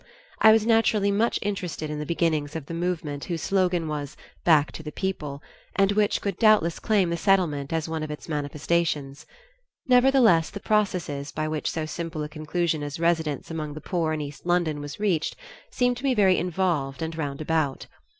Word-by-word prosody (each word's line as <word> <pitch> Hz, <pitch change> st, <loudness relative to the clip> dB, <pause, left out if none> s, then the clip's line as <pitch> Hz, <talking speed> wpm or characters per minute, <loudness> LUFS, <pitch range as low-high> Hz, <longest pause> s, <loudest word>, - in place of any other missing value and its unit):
I 220 Hz, -, +8 dB
was 220 Hz, -1 st, +4 dB
naturally 225 Hz, -3 st, +3 dB
much 220 Hz, +4 st, +1 dB
interested 180 Hz, -6 st, -3 dB
in 150 Hz, -, -4 dB
the 150 Hz, -, -5 dB
beginnings 155 Hz, -3 st, 0 dB
of 160 Hz, -4 st, -4 dB
the 165 Hz, -, -7 dB
movement 165 Hz, -4 st, -3 dB
whose 170 Hz, -3 st, -4 dB
slogan 180 Hz, -4 st, +1 dB
was 145 Hz, -2 st, -5 dB, 0.3 s
"Back 150 Hz, -5 st, +4 dB
to -, -, -8 dB
the 150 Hz, -1 st, -7 dB
People," 150 Hz, -6 st, -4 dB, 0.3 s
and 195 Hz, 0 st, +3 dB
which 205 Hz, 0 st, +1 dB
could 200 Hz, -3 st, -3 dB
doubtless 215 Hz, -7 st, +4 dB
claim 195 Hz, -6 st, +2 dB
the 170 Hz, -, -1 dB
Settlement 165 Hz, -7 st, +1 dB
as 160 Hz, -1 st, -1 dB
one 160 Hz, -1 st, -3 dB
of 155 Hz, -, -4 dB
its 150 Hz, -, -7 dB
manifestations. 150 Hz, -1 st, -2 dB, 0.6 s
Nevertheless 250 Hz, -9 st, +5 dB
the 200 Hz, -, -7 dB
processes 180 Hz, -10 st, -1 dB
by 155 Hz, 0 st, -2 dB
which 155 Hz, -1 st, -2 dB
so 160 Hz, -1 st, -3 dB
simple 165 Hz, 0 st, -4 dB
a 150 Hz, -, -5 dB
conclusion 155 Hz, +1 st, -1 dB
as 145 Hz, +1 st, -5 dB
residence 165 Hz, -3 st, 0 dB
among 155 Hz, -2 st, -4 dB
the -, -, -6 dB
poor 165 Hz, 0 st, -1 dB
in 155 Hz, -1 st, -2 dB
East 145 Hz, -1 st, -8 dB
London 170 Hz, -4 st, 0 dB
was 145 Hz, +4 st, -7 dB
reached, 185 Hz, -7 st, 0 dB, 0.3 s
seemed 245 Hz, -1 st, +1 dB
to 250 Hz, -, -9 dB
me 265 Hz, -2 st, +2 dB
very 190 Hz, -4 st, +4 dB
involved 165 Hz, -6 st, -1 dB
and 160 Hz, 0 st, -4 dB
roundabout. 150 Hz, -1 st, -1 dB
165 Hz, 185 wpm, -25 LUFS, 150-190 Hz, 0.6 s, I